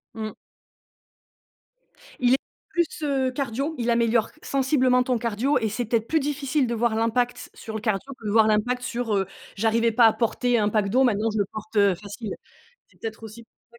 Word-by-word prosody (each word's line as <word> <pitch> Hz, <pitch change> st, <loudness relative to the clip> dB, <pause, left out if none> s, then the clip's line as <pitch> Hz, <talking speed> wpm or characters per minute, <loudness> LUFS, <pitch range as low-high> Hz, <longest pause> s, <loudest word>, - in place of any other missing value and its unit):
Mmh. 215 Hz, -1 st, -5 dB, 1.9 s
Il 250 Hz, 0 st, +4 dB
est -, -, +5 dB, 0.3 s
plus, 345 Hz, -1 st, +2 dB, 0.2 s
heu, 270 Hz, -3 st, +1 dB
cardio, 275 Hz, +4 st, -2 dB
il 240 Hz, -1 st, -1 dB
améliore 230 Hz, -1 st, +2 dB
sensiblement 260 Hz, -2 st, +2 dB
ton 250 Hz, -1 st, 0 dB
cardio 235 Hz, +5 st, 0 dB
et 220 Hz, -2 st, -1 dB
c'est 240 Hz, +3 st, -2 dB
peut-être 225 Hz, 0 st, 0 dB
plus 320 Hz, 0 st, +2 dB
difficile 285 Hz, -1 st, 0 dB
de 235 Hz, -, -2 dB
voir 230 Hz, -1 st, +1 dB
l'impact 240 Hz, +2 st, 0 dB
sur 220 Hz, -, -8 dB
le 220 Hz, -, -3 dB
cardio 215 Hz, +4 st, -2 dB
que 225 Hz, -, -13 dB
de 205 Hz, -, -1 dB
voir 220 Hz, 0 st, +5 dB
l'impact 245 Hz, +4 st, +1 dB
sur, 240 Hz, -3 st, -2 dB
heu: 195 Hz, -1 st, 0 dB, 0.3 s
«J'arrivais 230 Hz, +2 st, +2 dB
pas 230 Hz, +1 st, +5 dB
à 220 Hz, -, +3 dB
porter 245 Hz, +1 st, +1 dB
un 210 Hz, -1 st, +2 dB
pack 210 Hz, -2 st, +1 dB
d'eau, 255 Hz, +6 st, +3 dB
maintenant 225 Hz, -3 st, +2 dB
je 215 Hz, -, -3 dB
le 200 Hz, -, +2 dB
porte, 215 Hz, +1 st, -9 dB
heu, 200 Hz, -3 st, +5 dB
facile». 205 Hz, +3 st, -7 dB, 0.6 s
C'est -, -, -27 dB
peut-être 225 Hz, 0 st, -6 dB
aussi 220 Hz, +1 st, -10 dB
pour -, -, -59 dB, 0.2 s
ça 235 Hz, -, -18 dB
230 Hz, 200 wpm, -25 LUFS, 220-250 Hz, 1.9 s, est